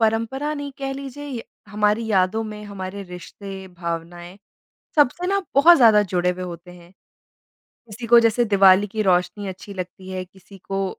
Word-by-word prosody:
परंपरा 230 +7 0
नहीं 285 -1 -6
कह 270 -1 -3
लीजिए 275 +1 -8
य 240 -4 -5 0.3
हमारी 210 +2 +1
यादों 205 +1 +1
में 210 -1 -8
हमारे 200 -1 -7
रिश्ते, 190 +1 -9
भावनाएँ, 175 +1 -7 0.6
सबसे 300 +5 +2
ना 395 +1 +1
बहुत 330 +5 +7
ज़्यादा 220 -6 +6
जुड़े 180 -2 0
हुए 180 +1 -5
होते 175 0 -9
हैं। 175 -1 -16 0.8
किसी 235 +1 -11
को 235 +1 +7
जैसे 230 +1 +2
दिवाली 195 -2 +5
की 215 +1 -3
रोशनी 185 +1 0
अच्छी 190 +2 -9
लगती 185 0 -7
है, 185 0 -4
किसी 190 +2 -17
को 195 -1 -3
200 Hz, 165 wpm, -22 LUFS, 185-230 Hz, 0.8 s, बहुत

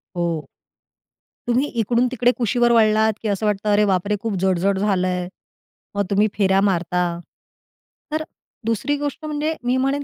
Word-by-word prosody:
हो, 170 -3 -1 1.0
तुम्ही 250 +4 +2
इकडून-तिकडे 245 +2 +2
कुशीवर 240 0 +2
वळलात, 220 -1 +4
की 225 - -3
असं 200 +1 -1
वाटतं 210 0 0
अरे 210 +1 +4
बापरे 200 +1 +1
खूप 225 0 -2
जड-जड 190 +1 +1
झालंय, 185 -3 0 0.7
मग 200 0 0
तुम्ही 205 +1 +3
फेऱ्या 195 -1 +3
मारता. 180 -3 +1 1.1
तर 310 +1 -1 0.4
दुसरी 230 +6 0
गोष्ट 290 +2 -4
म्हणजे 305 +1 -2
मी 250 +1 +1
म्हणेन 275 +2 0
215 Hz, 140 wpm, -21 LUFS, 195-245 Hz, 1.1 s, वळलात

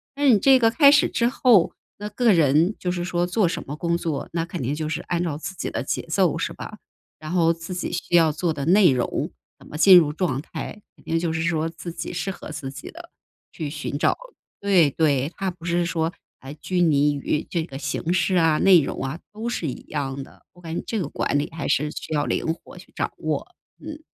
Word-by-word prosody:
那 285 0 +3
你 230 - +7
这 265 +5 +5
个 225 -2 +4
开 280 +4 +6
始 285 - +4
之 235 - +1
后， 240 -7 +4 0.2
那 205 +1 -5
个 225 +1 +3
人 165 +4 +3
就 180 - -2
是 175 -1 -3
说 175 -1 0
做 180 +2 +1
什 170 - -3
么 145 - -6
工 170 +2 0
作， 160 -4 -3
那 165 -1 -1
肯 175 0 -6
定 130 +4 -1
就 155 0 -3
是 155 - -3
按 175 0 -1
照 160 -4 -2
自 190 - -6
己 155 - -4
的 - - -2
节 - - -3
奏 - - +1
是 - - -2
吧， - - -9 0.4
然 155 +2 -7
后 170 -2 +3
自 165 +2 -8
己 180 - -3
需 175 - -2
要 165 -2 +5
做 160 +1 -1
的 140 -2 -4
内 185 0 +6
容 125 -2 -1 0.3
怎 - - -18
么 - - -10
进 185 +2 +8
入 150 -3 +3
状 155 -7 -1
态， 205 +5 -7
肯 - - -22
定 165 0 -1
就 165 -1 -1
是 160 - -1
说 165 -1 0
自 170 +1 -8
己 165 +1 -6
适 175 +3 -3
合 190 - -7
自 145 -3 -6
己 140 +1 -9
地 340 +1 -12 0.4
去 155 -4 -5
寻 150 -1 -4
找 - - +2 0.5
对， 180 -8 +4
对， 145 -2 +1
它 195 -1 -2
不 175 -1 -18
是 175 0 +1
说 165 -2 -1 0.3
还 135 +2 -9
拘 180 +3 -2
泥 145 -3 +3
于 145 +2 -1
这 170 -2 -1
个 135 -5 -8
形 155 +3 -3
式 185 +1 +1
啊， 165 -3 +4
内 185 -4 +6
容 140 - -4
啊， 135 +6 -4
都 220 +2 -5
是 180 -9 -2
一 130 - -5
样 140 -2 -3
的， - - -18
我 175 - -18
感 165 -1 -6
觉 - - -4
这 225 - -1
个 175 - -2
管 145 - -1
理 145 - -3
还 155 - -4
是 150 +1 +1
需 155 - -6
要 145 - +1
灵 160 - -1
活 - - -16
去 - - -14
掌 - - -2
握， - - -3 0.4
嗯。 310 0 -8
170 Hz, 260 characters per minute, -23 LUFS, 150-185 Hz, 0.5 s, 进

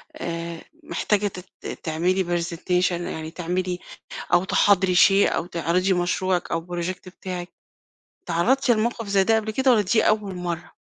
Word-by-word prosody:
آآ، 170 0 -5 0.2
محتاجة 210 -7 0
تت 180 -1 -10 0.2
تعملي 175 +4 +1 0.2
presentation 180 +2 0
يعني 160 -2 -4
تعملي 180 +1 -2 0.5
أو 175 +1 +5
تحاضري 190 -1 +3
شئ 195 +2 +6
أو 165 - -1
تعرضي 180 +2 0
مشروعِك 180 0 0
أو 165 +1 -2
project 180 +2 -4
بتاعِك، 180 -1 -5 0.8
اتعرضتِ 250 +10 +1
لموقف 230 0 0
زي 200 -1 +3
ده 225 +2 +3
قبل 220 0 -1
كده 265 +3 +3
والّا 220 -4 +4
دي 205 +4 +2
أول 205 -3 0
مَرّة؟ 175 -2 -5
185 Hz, 145 wpm, -24 LUFS, 175-200 Hz, 0.8 s, شئ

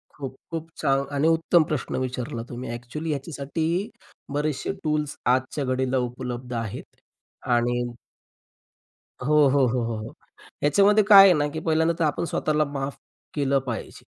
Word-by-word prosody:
खूप-खूप 150 +4 -7
छान 135 0 +1
आणि 145 +3 +2
उत्तम 165 +1 +4
प्रश्न 150 - -2
विचारला 125 -2 -4
तुम्ही. 125 +1 -6
ॲक्चुअली 120 +7 -6
ह्याच्यासाठी 160 +5 -2 0.4
बरेचसे 145 -1 -1
टूल्स 150 -2 -1 0.2
आजच्या 130 +2 -3
घडीला 130 0 0
उपलब्ध 125 0 -6
आहेत 115 -3 -5 0.6
आणि 120 +1 +1 1.4
हो, 150 +3 +2
हो, 135 -1 +4
हो, 125 +1 0
हो, 115 0 -2
हो. 110 +1 -7 0.5
याच्यामध्ये 200 +8 +5
काय 200 -1 +10
आहे 185 - +7
ना, 145 0 +1
की 150 +2 -5
पहिल्यांदा 160 +1 +2
तर - - +2
आपण 150 - -1
स्वतःला 155 0 +1
माफ 140 -1 -4 0.4
केलं 140 -2 +1
पाहिजे. 125 -4 -6
140 Hz, 140 wpm, -25 LUFS, 125-155 Hz, 1.4 s, काय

